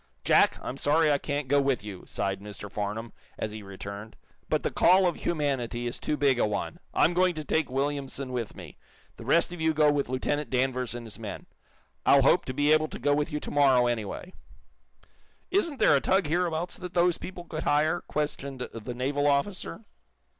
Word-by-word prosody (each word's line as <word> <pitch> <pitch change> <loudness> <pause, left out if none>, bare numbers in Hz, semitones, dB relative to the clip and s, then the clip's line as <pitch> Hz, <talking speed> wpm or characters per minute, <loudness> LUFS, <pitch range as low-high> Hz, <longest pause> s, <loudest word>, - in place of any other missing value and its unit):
"Jack, - - +4
I'm 130 - -5
sorry 150 +2 +3
I 140 - +2
can't 145 -1 -3
go 140 +2 +4
with 135 -5 0
you," 100 -4 -8
sighed 95 0 -2
Mr. 105 -1 -9
Farnum, 105 +3 -4 0.2
as 110 - -3
he 110 0 -7
returned. 100 +2 -8 0.3
"But - - +1
the - - -1
call 185 +1 +5
of 175 - +1
humanity 135 -7 -1
is 120 - -3
too 150 - -1
big 135 -4 +3
a - - +3
one. 105 +10 -3
I'm 175 - +3
going 180 0 +2
to 155 - -4
take 160 0 0
Williamson 135 0 -2
with 120 -4 -4
me. - - -11 0.4
The - - -10
rest 170 +1 +3
of 175 - -7
you 160 -1 +2
go 150 -1 +5
with 145 -3 -1
Lieutenant 135 +2 -1
Danvers 130 -1 0
and 120 -1 -7
his 110 0 -9
men. 110 -3 -7 0.6
I'll 140 -1 +6
hope 170 +6 +4
to 130 - -4
be 145 +2 +4
able 155 0 +3
to - - -7
go 145 +3 +1
with 145 0 0
you 150 - -2
to - - -6
morrow, 135 -4 +4
anyway." 120 - -3 1.2
"Isn't 340 -6 +2
there 150 - +5
a 140 - +2
tug 190 0 +2
hereabouts 170 +1 -1
that 180 -1 -8
those 175 0 +3
people 180 -2 -7
could 160 -2 -5
hire?" 155 +3 +2
questioned 140 -3 -4
the 115 +2 -6
naval 140 +3 0
officer. 140 - -1
140 Hz, 200 wpm, -28 LUFS, 120-155 Hz, 1.2 s, I'll